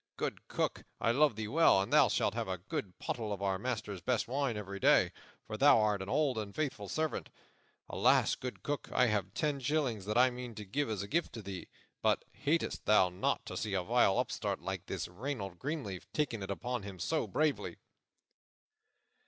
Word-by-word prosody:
Good - - -3
Cook, - - -1 0.2
I 115 - +2
love 145 0 +4
thee 110 0 -3
well, 160 -3 +5
and 95 - -1
thou - - +7
shalt - - +1
have - - -2
a 95 0 -2
good 90 0 -5
pottle 110 -3 -3
of 100 -1 -3
our 95 -1 0
master's 110 -5 -3
best - - 0
wine 130 -2 0
every 100 -1 -5
day, - - +5 0.3
for 110 - -5
thou 140 -2 +7
art 105 -2 +2
an 95 - -5
old 135 -3 +2
and 100 -2 -6
faithful 120 -10 -2
servant. 155 -1 -2 0.6
Also, - - +3
good 125 -1 -6
Cook, 145 0 -3
I 125 - +4
have 100 -4 -1
ten 150 -3 0
shillings 130 -7 0
that 105 +2 -1
I 125 +1 +6
mean 125 -2 -7
to 105 - -7
give 140 +8 -1
as 105 -3 -2
a - - -6
gift 165 +9 0
to 110 - -7
thee. 95 -2 -6 0.3
But - - +2
hatest 160 +4 -1
thou 105 -3 +6
not 90 +1 -1
to - - -6
see 105 -3 -2
a 90 - 0
vile 115 -1 +3
upstart - - -1
like - - -4
this - - -3
Reynold 100 -2 -5
Greenleaf 130 - -4
taking 125 -8 -1
it 95 - -5
upon 120 +4 -2
him 100 -1 -8
so 155 - -1
bravely?" 155 -2 0
110 Hz, 200 wpm, -33 LUFS, 100-135 Hz, 0.6 s, thou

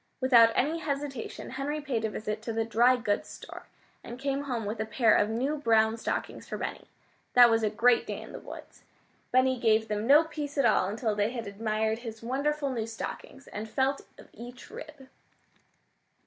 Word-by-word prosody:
Without 240 -3 +6
any 310 +5 +1
hesitation 280 -7 -5
Henry 275 +3 -3
paid 265 -7 -2
a 220 - 0
visit 215 0 -4
to 230 - -4
the 225 0 -1
dry 235 +3 +4
goods 215 -4 -2
store, - - -10 0.4
and 240 - -8
came 275 +1 -2
home 240 -5 -3
with 210 +2 -4
a 220 - -1
pair 225 0 +3
of 210 - +2
new 260 +7 -1
brown 225 -5 +3
stockings 230 - -4
for - - -4
Benny. - - -5 0.5
That 245 -1 +8
was 225 0 +3
a 215 - +1
great 235 +3 +3
day - - -4
in - - -10
the - - -8
woods. - - -11 0.5
Benny 255 0 +3
gave 220 -2 +2
them 210 +1 -2
no 295 +4 +7
peace 300 -3 -6
at 275 - +3
all 215 -4 +3
until 220 +1 -1
they 205 +1 +1
had 235 -2 -5
admired 220 +2 -1
his 225 -2 -8
wonderful 280 +3 -1
new 230 -3 -3
stockings, 250 +4 -7
and 215 +1 -6
felt 270 +3 0 0.2
of - - -14
each 245 +2 -11
rib. 290 -3 -10
235 Hz, 190 wpm, -28 LUFS, 220-275 Hz, 0.5 s, That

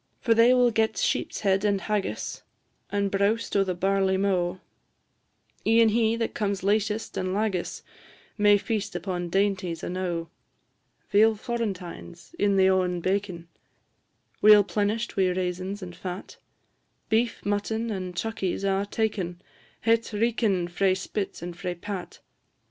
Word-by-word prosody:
For 230 - +3
they 230 +2 +6
will 250 -1 +4
get 220 0 +1
sheep's - - -1
head 195 -1 +2
and 205 -2 +2
haggis, 195 - -2 0.5
And 200 -1 0
browst 205 +4 0
o' 200 - +4
the 185 -2 -2
barley 190 +1 +1
mow; 185 -2 0 1.0
E'en 225 0 +5
he 225 0 +2
that 230 -1 -2
comes 200 -2 -2
latest 210 +2 0
and 185 0 -1
lagis 205 -4 -2 0.5
May 205 -1 +5
feast 210 -2 -3
upon 175 -1 -3
dainties 190 -2 0
enow. 175 -2 -3 0.8
Veal 220 +2 +5
florentines, 200 - -5
in 200 -1 +3
the 190 0 +5
o'en 185 -2 +2
baken, 185 -2 -2 0.9
Weel 210 -1 +8
plenish'd 215 +3 -1
wi' 190 -1 +3
raisins 185 +2 -3
and 175 -1 -8
fat; 180 +1 -7 0.7
Beef, 230 +2 0
mutton, 220 +3 -1
and 185 -3 -4
chuckies, 200 -2 -2
a' 195 +1 +1
taken 200 -6 -2 0.4
Het 230 0 +2
reekin' 210 -5 +1
frae 185 +2 +1
spit 190 -1 -4
and 175 0 -6
frae 180 -1 -4
pat. 190 +1 -7
200 Hz, 135 wpm, -26 LUFS, 185-220 Hz, 1.0 s, Weel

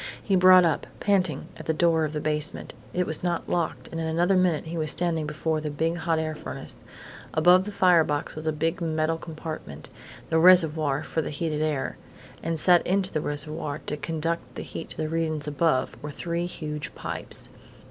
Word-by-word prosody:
He 195 - +1
brought 185 -1 +7
up, 160 -3 0
panting, 185 -8 +1
at - - -10
the 160 - +1
door 165 -1 +3
of 150 - -5
the 150 - -2
basement. 150 0 -2 0.2
It 180 0 0
was 160 -2 -1
not 175 -1 -1
locked 170 -2 -2
and 165 - -3
in 160 - -2
another 175 +4 +2
minute 180 -4 +2
he 165 +1 -5
was 155 -1 0
standing 165 -2 +1
before 155 +1 -1
the 155 - -3
big 160 +3 -1
hot 165 -1 0
air 160 0 -1
furnace. 155 - -7 0.6
Above 180 +4 +6
the 210 - -5
fire 180 -4 +5
box 145 -1 -2
was 155 +1 -6
a - - +3
big 165 +4 -1
metal 160 0 0
compartment 155 - -7 0.4
the 160 - +4
reservoir 160 -5 +5
for 160 - -2
the - - -4
heated 155 0 -2
air. 150 -3 -1 0.4
And 165 -1 -1
set 175 +1 +5
into 190 0 +1
the 155 - 0
reservoir, 150 0 -3
to - - -2
conduct 165 +2 -3
the - - -5
heat 165 - -7
to - - -8
the 155 - -1
regions 155 -2 -1
above, 150 -3 +1
were 150 - -5
three 170 +4 -3
huge 150 -4 -5
pipes. - - -2
160 Hz, 200 wpm, -26 LUFS, 155-170 Hz, 0.6 s, brought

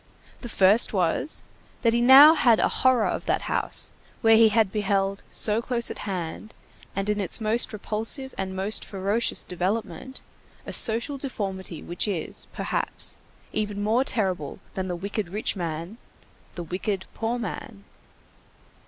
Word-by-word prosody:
The 240 - -8
first 205 +3 +4
was, 185 - +1 0.4
that 230 -1 +3
he 235 - +2
now 270 +5 +9
had 240 -8 +4
a - - +3
horror 255 -4 +4
of - - -3
that - - 0
house, - - -1 0.3
where 225 -2 +6
he 225 0 +6
had 215 -2 +2
beheld, 195 -1 0
so 215 +1 +1
close 235 -1 -1
at - - -8
hand, 185 +3 -5 0.4
and 195 +1 -2
in 210 0 0
its 190 - -1
most 220 +2 0
repulsive 225 +5 -2
and 190 -1 -4
most 195 +3 0
ferocious 200 +4 0
development, 200 +6 -4 0.4
a - - -7
social 235 +5 +4
deformity 190 - -5
which 175 +5 -1
is, 190 -6 -2
perhaps, - - -2 0.4
even 210 -1 -2
more 225 +5 +2
terrible 185 - -2 0.2
than 190 -1 -3
the 180 - -3
wicked 200 +1 -4
rich 210 +4 -1
man, 170 +4 -5 0.6
the 175 - -5
wicked 190 +3 -3
poor 230 +2 -2
man. 215 -1 -7
210 Hz, 150 wpm, -25 LUFS, 190-230 Hz, 0.6 s, now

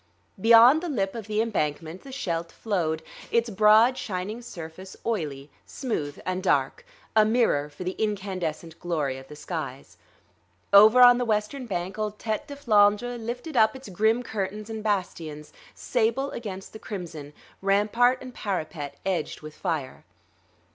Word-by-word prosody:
Beyond 235 +7 +7
the 350 - -4
lip 195 -9 -1
of 225 -3 -7
the 215 0 +1
embankment, 165 -5 -3
the 275 - -11
Scheldt 170 -9 -3
flowed, 165 -7 -2 0.3
its 235 -1 +1
broad 215 +5 +5
shining 205 +4 -4
surface 185 -3 -9
oily, 150 -10 -3 0.2
smooth 150 - -4
and 185 0 -2
dark, 190 - +1 0.3
a 215 - +7
mirror 215 -10 +2
for 150 +4 -9
the 180 - -2
incandescent 185 -6 -3
glory 150 -6 -2
of 135 - -14
the 150 - -11
skies. 150 -4 -6 0.8
Over 215 +5 +8
on 245 0 +8
the - - +1
western 225 +4 -1
bank 185 0 -4
old 210 -1 -2
Tête 220 +7 -3
de 285 - -7
Flandre 220 -2 +3
lifted 245 +7 -5
up 220 +1 +4
its 265 -4 -10
grim 220 +6 +2
curtains 210 0 -4
and 220 -1 -5
bastions, 165 -7 -3 0.2
sable 245 +4 0
against 195 -5 -7
the 220 - -9
crimson, 170 -9 -7 0.3
rampart 215 +6 +3
and 255 -1 -9
parapet 155 -9 -4
edged 180 -5 -2
with 155 0 -9
fire. 155 -8 -4
205 Hz, 150 wpm, -26 LUFS, 170-230 Hz, 0.8 s, Over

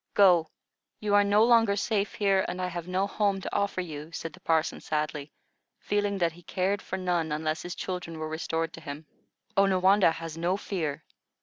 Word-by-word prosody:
Go, 180 -5 +5 0.5
you 210 -1 -1
are 205 0 +6
no 205 +2 +4
longer 225 -3 +5
safe 205 0 -1
here, 195 -2 +2
and 180 +1 -4
I 185 - 0
have 175 -1 -6
no 185 +2 +1
home 200 -1 0
to - - -5
offer 200 -2 0
you," 155 -2 -7
said 165 -1 -6
the - - -14
parson, 160 -1 0
sadly, 150 -1 -3 0.5
feeling 205 -1 -1
that 170 -3 +1
he 170 +2 -15
cared 190 +3 -1
for 190 - -4
none, 175 -4 0
unless 155 +1 -1
his 175 0 -6
children 180 -3 -5
were 155 0 -4
restored 160 +1 -2
to 165 - -10
him. 150 0 -7 0.5
"Onawandah 195 -2 +4
has 165 -1 -7
no 180 +3 +1
fear. 165 -8 -3
180 Hz, 190 wpm, -28 LUFS, 160-200 Hz, 0.5 s, are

